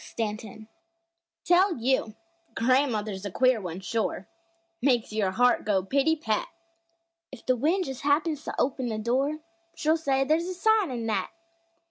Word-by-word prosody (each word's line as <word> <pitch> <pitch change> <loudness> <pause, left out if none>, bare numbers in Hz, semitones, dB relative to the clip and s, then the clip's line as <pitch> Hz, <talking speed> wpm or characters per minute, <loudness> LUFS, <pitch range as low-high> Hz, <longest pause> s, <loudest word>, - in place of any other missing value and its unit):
STANTON 220 -1 -5 0.8
Tell 360 0 +4
you, 235 -2 0 0.4
gran'mother's 230 -6 +1
a 200 - -3
queer 255 +2 +2
one, 180 0 -6
shore 215 -2 -2 0.5
Makes 245 -5 +1
your 210 -3 +1
heart 245 +5 +3
go 195 -3 +1
pitty 280 - +2
pat! 220 -9 -1 0.8
If 265 - -12
the 255 - +3
wind 330 +9 +1
just 265 -3 -6
happens 300 +1 +1
to - - -4
open 255 -2 0
a 215 - -3
door, 260 +7 0 0.4
She'll 315 +1 +2
say 275 -4 +1
there's 315 +5 +1
"a 370 - -4
sign" 435 0 +3
in 240 -3 -4
that! 220 -2 -1
255 Hz, 150 wpm, -27 LUFS, 220-300 Hz, 0.8 s, Tell